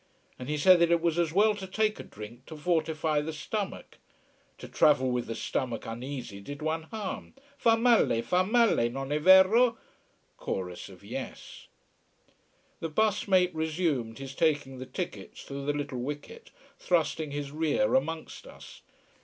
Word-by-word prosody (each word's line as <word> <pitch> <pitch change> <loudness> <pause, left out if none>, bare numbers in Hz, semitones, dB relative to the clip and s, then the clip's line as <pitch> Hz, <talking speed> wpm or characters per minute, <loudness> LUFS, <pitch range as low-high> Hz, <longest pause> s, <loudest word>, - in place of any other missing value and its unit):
And 125 +2 -7
he 150 - 0
said 180 +4 +6
that 170 0 +4
it 170 0 +4
was 170 0 0
as 170 -2 +1
well 210 +5 +4
to 195 -2 -7
take 215 +2 0
a - - -6
drink, 110 +5 -11
to 160 - -9
fortify 160 -2 0
the 155 +2 -4
stomach. 195 +6 -5 0.6
To - - -9
travel 130 -4 +3
with 125 -1 -2
the 115 - -4
stomach 120 0 -3
uneasy 120 -2 -6
did 145 +8 -8
one 160 0 -2
harm: 210 -4 -6 0.2
fa 225 -1 +3
male, 230 - +3
fa 180 +1 +2
male 220 - +3
non 135 +2 -5
è 150 +1 0
vero? 195 +7 +6 0.6
Chorus 90 -2 -5
of - - -15
"yes." - - -8 1.1
The 165 - -3
bus 210 +6 +1
mate 185 -2 +3
resumed 155 -8 -1
his 135 0 -7
taking 145 -4 0
the 130 - -7
tickets - - -6
through 140 0 -7
the - - +3
little 145 -3 -4
wicket, 150 - -7 0.3
thrusting 160 -3 0
his 145 -1 -5
rear 160 - +1
amongst 165 -12 -2
us. - - -13
155 Hz, 160 wpm, -29 LUFS, 135-185 Hz, 1.1 s, said